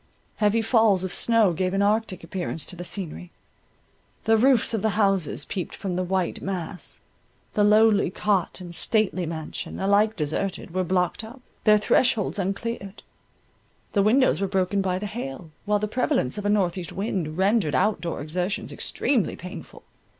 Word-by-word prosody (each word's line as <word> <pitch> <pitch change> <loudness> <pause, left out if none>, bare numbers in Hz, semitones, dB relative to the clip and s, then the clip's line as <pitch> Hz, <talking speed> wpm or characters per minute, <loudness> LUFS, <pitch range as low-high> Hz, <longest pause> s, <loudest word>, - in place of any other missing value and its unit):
Heavy 215 +2 +2
falls 220 -5 +3
of 185 - -4
snow 225 -6 +3
gave 185 +3 -1
an 195 - +2
arctic 210 -3 0
appearance 170 -1 -4
to 180 - -3
the 175 - -7
scenery; 180 -1 -5 0.9
the 225 0 +4
roofs 245 0 +3
of 220 - 0
the 215 0 0
houses 195 -8 +1
peeped 180 -4 -5
from 190 -4 -4
the 185 - 0
white 185 -1 -1
mass; 180 -2 -4 0.5
the 210 - +2
lowly 210 -2 +5
cot 195 -1 0
and 175 -2 -9
stately 190 -3 0
mansion, 160 -1 -6
alike 205 +3 +3
deserted, 170 +3 -3
were 185 0 +1
blocked 180 +4 0
up, 230 +5 -10 0.3
their 215 -1 +7
thresholds 210 -1 +2
uncleared; 200 +1 -4 0.9
the 200 - +3
windows 235 +3 +3
were 195 - +1
broken 190 +1 0
by 185 -1 0
the 200 - -4
hail, 170 - -6
while 210 0 +2
the 210 +1 -2
prevalence 210 - 0
of 205 - -2
a - - +2
north 195 -3 +1
east 170 -3 -7
wind 185 -6 -3
rendered 190 - +2
out 205 +6 +2
door 170 -4 -4
exertions 180 +7 -2
extremely 245 -6 0
painful. 180 +2 -10
195 Hz, 165 wpm, -25 LUFS, 180-215 Hz, 0.9 s, their